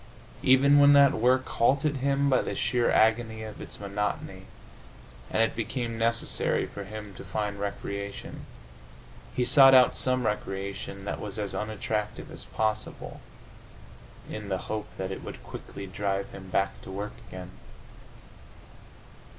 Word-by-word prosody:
Even 140 +2 +6
when 145 0 +8
that 140 -1 +7
work 130 +3 +2
halted 140 +4 +2
him 140 +1 +1
by 130 -2 +4
the - - -4
sheer 120 -1 +1
agony 110 0 +2
of 110 -1 -8
its - - -9
monotony, 100 +1 -3 0.8
and 115 - +2
it 115 - 0
became 115 +1 -3
necessary 115 +1 +1
for 100 - -8
him 105 0 -8
to - - -10
find 105 -2 -3
recreation, 100 0 -5 0.9
he 125 - +1
sought 135 0 +8
out 125 -1 +6
some 130 -1 +1
recreation 100 -1 -4
that - - -3
was 105 0 -6
as 105 -2 -3
unattractive 105 0 -3
as - - -7
possible, 110 -1 -3 1.1
in 105 -1 -6
the 95 - 0
hope 105 +3 -4
that 95 0 -3
it - - -6
would - - -8
quickly 100 - -8
drive 100 +1 -2
him 95 -1 -10
back 95 +1 0
to - - -11
work 100 +2 -5
again. 90 0 -8
110 Hz, 140 wpm, -28 LUFS, 100-125 Hz, 1.1 s, when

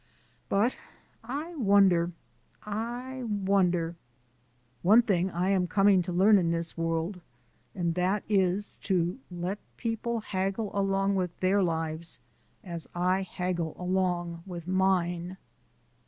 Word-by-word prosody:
But 210 +6 +2 0.5
I 290 +9 -4
wonder 195 - +4 0.5
I 240 +5 -4
wonder. 190 -5 +1 0.9
One 215 +6 +6
thing 190 -5 +1
I 180 +1 -1
am 185 -2 +2
coming 195 0 +4
to 180 +1 -4
learn 195 +4 +5
in 170 -2 +1
this 170 0 -2
world, 165 +3 -2 0.5
and 170 -3 0
that 185 +4 0
is 195 -1 +1
to 180 +3 +1
let 180 +3 -4 0.2
people 230 0 -2
haggle 195 +1 -2
along 195 0 +1
with 180 -2 -2
their 190 +2 +3
lives 165 -1 -2 0.4
as 170 -3 -7
I 180 +2 +2
haggle 180 -3 -3
along 180 -2 -1
with 175 -2 -7
mine. 185 -1 +1
185 Hz, 120 wpm, -29 LUFS, 175-200 Hz, 0.9 s, One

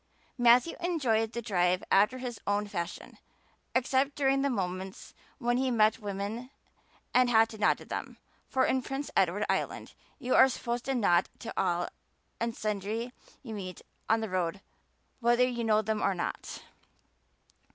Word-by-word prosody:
Matthew 245 +5 +5
enjoyed 255 -11 +1
the 235 - -4
drive 180 -4 +1
after 210 +6 +4
his 250 -3 -5
own 205 +1 +1
fashion, 175 -4 -6 0.6
except 265 +2 +2
during 270 -1 +2
the 280 - +1
moments 190 -4 -4 0.2
when 240 -2 +1
he 260 0 +1
met 220 -3 +3
women 205 +4 -4 0.6
and 250 0 +5
had 225 -1 +5
to 220 - -10
nod 210 - +3
to - - -12
them - - -5 0.3
for 260 -1 +2
in 260 - +1
Prince 270 +3 -5
Edward - - +2
island - - -2 0.2
you 255 -3 -2
are 265 - +7
supposed 240 -1 -3
to 270 - 0
nod 175 -7 +3
to - - -7
all 175 -2 0 0.5
and 230 0 -2
sundry 215 +3 -3 0.3
you 230 -4 -7
meet 185 -4 -7 0.3
on 225 0 +3
the 220 - -3
road 185 +1 -1 0.6
whether 240 +1 +4
you 240 -2 -3
know 215 -1 +3
them 215 0 -1
or 195 - +1
not. 175 - -5
225 Hz, 160 wpm, -30 LUFS, 200-255 Hz, 0.6 s, are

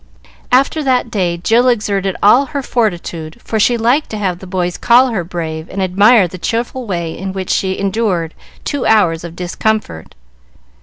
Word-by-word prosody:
After 275 +5 +3
that 250 -3 +1
day 180 -4 -1
Jill 225 +8 +2
exerted 200 -5 0
all 245 +7 +6
her 280 +1 -4
fortitude, 175 -9 -2
for 220 - -3
she 240 +3 +3
liked 245 +7 +1
to 215 - -5
have 185 -4 -2
the 190 - -11
boys 180 -1 -2
call 245 +2 +4
her 215 -7 -2
brave 160 -2 -5
and 195 - -6
admire 195 +3 +4
the 180 +2 -10
cheerful 235 +5 -3
way 170 -4 -3
in 190 +1 -5
which 190 -1 -4
she 190 -1 0
endured 195 -5 -1 0.3
two 285 -3 -2
hours 180 -7 +3
of 170 -1 -8
discomfort. 180 - -3
195 Hz, 170 wpm, -15 LUFS, 175-235 Hz, 0.3 s, all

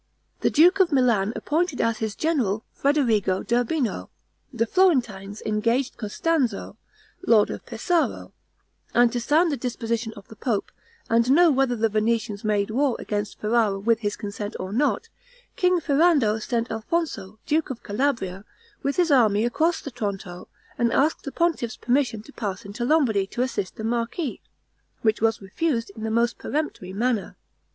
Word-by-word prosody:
The - - +2
duke 355 +6 +5
of 365 -3 +4
Milan 235 -7 +3
appointed 320 -1 -1
as 230 -1 +1
his 220 -2 -3
general, 245 -11 0
Federigo 230 -10 +1
d'Urbino; 245 +2 0 0.4
the 235 -3 0
Florentines 230 - +1
engaged 230 +5 0
Costanzo, 240 -1 -1 0.5
lord 215 -3 +5
of - - -6
Pesaro; 325 +9 -1 0.6
and 240 -1 +5
to 240 - -2
sound 315 +7 +3
the 285 - -1
disposition 230 -2 -3
of 205 -3 -13
the 220 - -12
pope, 215 -3 -2 0.4
and 230 +2 +2
know 330 +4 +6
whether 265 -2 +2
the 225 0 +2
Venetians 215 -1 -1
made 210 -1 0
war 265 +1 +1
against 205 0 -4
Ferrara 215 -2 +1
with 225 +3 +1
his 205 -2 -2
consent 205 0 -6
or 190 +1 -5
not, 290 - +1 0.5
King 360 -1 +3
Ferrando 285 -8 +3
sent 235 +1 -2
Alfonso, 225 - -3
duke 315 +1 +1
of 255 -3 -6
Calabria, 205 -5 -1 0.4
with 280 0 -1
his 350 -3 +2
army 220 -5 +4
across 320 +8 +1
the 280 - -7
Tronto, 195 -6 -5 0.3
and 235 -1 +2
asked 300 +3 +1
the 275 - -4
pontiff's 305 -7 0
permission 245 -4 0
to 285 - -15
pass 200 -1 -4
into 205 +4 -5
Lombardy 240 -10 +2
to 240 - -2
assist 230 -7 -3
the 220 - -7
marquis, 235 +6 -2 0.6
which 220 -2 +2
was 225 -2 +1
refused 230 - -1
in 220 - -9
the 220 - -2
most 235 +2 +1
peremptory 295 -11 -3
manner. 225 +1 -1
235 Hz, 160 wpm, -24 LUFS, 210-280 Hz, 0.6 s, know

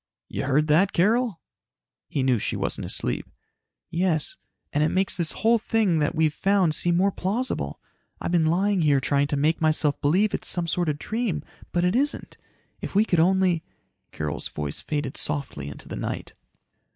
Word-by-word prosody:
"You - - -3
heard 145 +3 +2
that, 165 +6 +3
Carol?" 215 +1 +2 0.7
He 140 - -1
knew 130 -3 +2
she - - -2
wasn't - - -2
asleep. - - -2 0.6
"Yes. 170 -3 0 0.4
And 150 - +2
it 155 - +3
makes 190 +3 +1
this 170 -3 0
whole 230 +2 +3
thing 215 -7 +1
that 150 +1 0
we've 155 -1 +2
found 190 -2 +2
seem 170 +2 +2
more 195 +2 +3
plausible. 195 - -2 0.4
I've - - -3
been 165 -3 +3
lying 190 +3 +2
here 145 -3 +4
trying 140 +1 +1
to 145 - -1
make 155 +4 +1
myself 155 -2 +1
believe 190 +9 +2
it's - - -2
some 175 -2 +1
sort 170 0 0
of 145 - -1
dream, 215 -4 -2 0.3
but 175 - +1
it 180 +3 +2
isn't. 280 +3 -1 0.5
If - - -6
we 210 +2 +5
could 175 -6 +1
only 180 -1 +3 0.2
..." - - -50
Carol's 75 -1 -4
voice 75 -1 -5
faded 145 -3 -3
softly 140 - -2
into 70 - -9
the - - -6
night. - - -4
165 Hz, 180 wpm, -25 LUFS, 150-190 Hz, 0.7 s, we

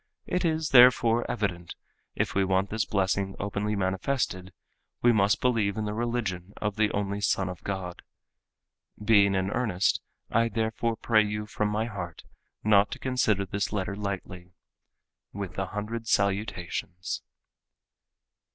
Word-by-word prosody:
It 180 - -1
is 160 -2 0
therefore 120 -2 +6
evident 100 -7 -3 0.4
if - - -1
we 95 - +2
want 95 +1 +1
this 110 0 0
blessing 95 -1 0
openly 100 +1 -2
manifested, 95 0 -1 0.5
we 120 - +7
must 105 -2 +3
believe 110 -6 +1
in 110 - -1
the 105 - -2
religion 110 -5 -2
of 105 -1 -2
the 110 -1 +2
only 100 0 -2
Son 95 -2 +1
of 90 -2 -7
God. 95 -3 -4 1.0
Being 100 -2 +4
in 95 +1 0
earnest, 105 -6 +1 0.3
I 115 +1 +3
therefore 115 +1 -1
pray 110 -1 +3
you 105 0 -3
from 105 0 -1
my 105 +2 0
heart 90 -7 -6 0.4
not 105 -1 +5
to - - -7
consider 110 -6 +1
this 100 +2 -2
letter 100 -1 -2
lightly. 90 -3 -5 0.8
With 100 -3 -5
a 95 - -1
hundred 110 +3 -5
salutations." 95 -3 -1
105 Hz, 140 wpm, -28 LUFS, 95-110 Hz, 1.0 s, we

